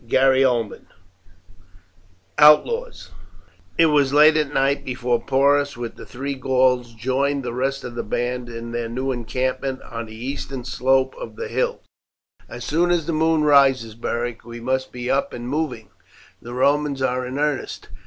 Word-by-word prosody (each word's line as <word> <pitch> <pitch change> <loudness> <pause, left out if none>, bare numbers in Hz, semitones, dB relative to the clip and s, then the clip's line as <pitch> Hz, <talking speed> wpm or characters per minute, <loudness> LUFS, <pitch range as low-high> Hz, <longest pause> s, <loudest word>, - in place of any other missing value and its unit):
CHAPTER 135 +3 +4
XIX: 120 -5 0 1.5
OUTLAWS 460 - +4 0.7
It 165 - +6
was 145 -3 +3
late 150 +2 +6
at 150 -2 0
night 135 0 +1
before 125 -2 -1
Porus 140 +1 +2
with 120 -1 -6
the - - -11
three 140 +3 -4
Gauls 125 -2 +1
joined 135 +4 -1
the 120 - -3
rest 135 +2 -2
of 125 - -7
the 120 - -3
band 120 +2 -3
in 115 0 -7
their 120 -1 -3
new 130 +3 -2
encampment 130 +2 -2
on 115 -1 -7
the 110 - -11
eastern 130 +1 -5
slope 130 +1 +1
of - - -8
the 465 -1 -5
hills. 485 +1 -2 0.6
"As - - -7
soon 170 +3 +1
as 175 -3 +1
the 170 - -2
moon 160 0 +2
rises, 135 -6 +4
Beric, 120 +1 -4
we 120 0 -9
must 130 +2 -2
be 125 0 -6
up 140 - 0
and 120 0 -6
moving. 140 -5 -3 0.5
The 120 +1 -8
Romans 140 +1 +1
are 130 0 0
in 125 +2 -5
earnest. 150 -2 -2
130 Hz, 165 wpm, -22 LUFS, 120-145 Hz, 1.5 s, It